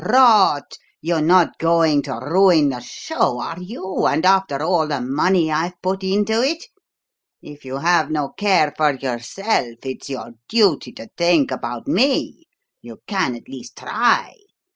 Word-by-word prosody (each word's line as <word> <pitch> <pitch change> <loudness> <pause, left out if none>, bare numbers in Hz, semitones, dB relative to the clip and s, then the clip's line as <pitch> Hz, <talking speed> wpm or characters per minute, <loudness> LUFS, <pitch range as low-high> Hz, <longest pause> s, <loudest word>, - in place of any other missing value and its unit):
"Rot! 215 - +4 0.2
You're 165 0 -1
not 175 +3 +3
going 165 -3 +3
to - - -6
ruin 170 -1 +4
the 125 -2 -4
show, 125 - -2
are 165 +8 -6
you, 190 -1 -3
and 160 - 0
after 190 -7 +2
all 165 -2 +1
the 145 -3 -2
money 155 +6 +1
I've 170 +3 -2
put 190 +1 -3
into 210 +4 +1
it? 315 - -1 0.8
If 145 -1 -13
you 130 +1 -5
have 165 0 +2
no 150 -3 -2
care 185 -8 +1
for 150 -2 +1
yourself, 130 - -3
it's 130 +1 -7
your 130 -3 -6 0.2
duty 200 - +2
to 115 - -11
think 170 -6 +2
about 120 -2 -5
me. 270 - 0 0.4
You - - -12
can 190 - -1
at 120 - -13
least 125 -3 -11
try. 235 +1 0
165 Hz, 155 wpm, -20 LUFS, 140-195 Hz, 0.8 s, Rot